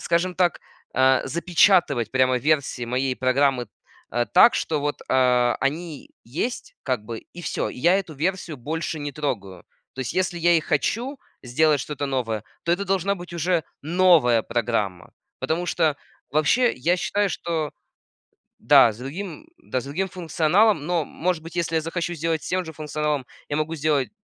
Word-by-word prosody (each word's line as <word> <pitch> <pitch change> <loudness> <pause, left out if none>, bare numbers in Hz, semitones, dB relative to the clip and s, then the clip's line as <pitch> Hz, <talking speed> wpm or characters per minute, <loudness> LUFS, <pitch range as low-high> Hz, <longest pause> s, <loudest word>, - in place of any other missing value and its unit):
скажем 180 +2 0
так, 175 -2 +1 0.3
а, 130 0 +4
запечатывать 170 - +3
прямо 130 -1 +3
версии 140 -2 0
моей 130 +2 0
программы, 130 -1 +2 0.4
а, 120 0 0
так, 235 +6 +6
что 155 -3 -1
вот, 145 0 -2
а, 125 -2 +3
они 150 +2 -3
есть, 165 - -4
как 130 -4 -1
бы, 115 0 -6
и 175 - -13
всё. - - -2
Я 170 +8 +2
эту 180 -5 -6
версию 170 +1 -2
больше 155 +5 -4
не 145 -1 -5
трогаю. 100 - -4 0.3
То 130 - -6
есть, 130 - -3
если 185 -1 0
я 175 +1 +4
и - - +2
хочу 235 - -1 0.2
сделать 145 +4 +2
что-то 145 +2 -4
новое, 115 -6 -2 0.2
то 170 - +2
это 200 +3 0
должна 195 0 +1
быть 175 -2 -10
уже 170 0 0 0.2
новая 160 -8 +4
программа. 105 -7 -2 0.3
Потому 170 +3 -1
что 160 -4 +1 0.3
вообще 155 - +3
я 170 +8 +1
считаю, 200 +2 0
что 160 -4 -2 0.9
Да, 115 - +7
с 105 - -12
другим, 175 - -7
да, 130 - -3
с - - -9
другим 180 +8 -2
функционалом. 175 +1 +2
Но, 170 -2 0
может 175 +2 -2
быть, 165 +2 -11
если 170 -1 -1
я 160 - +2
захочу 170 +2 -3
сделать 165 -1 -2
с - - -6
тем 185 0 0
же 160 - -8
функционалом, 150 -2 -2 0.2
я 145 - -2
могу 155 +2 -1
сделать 145 -3 +1
155 Hz, 170 wpm, -24 LUFS, 130-175 Hz, 0.9 s, Да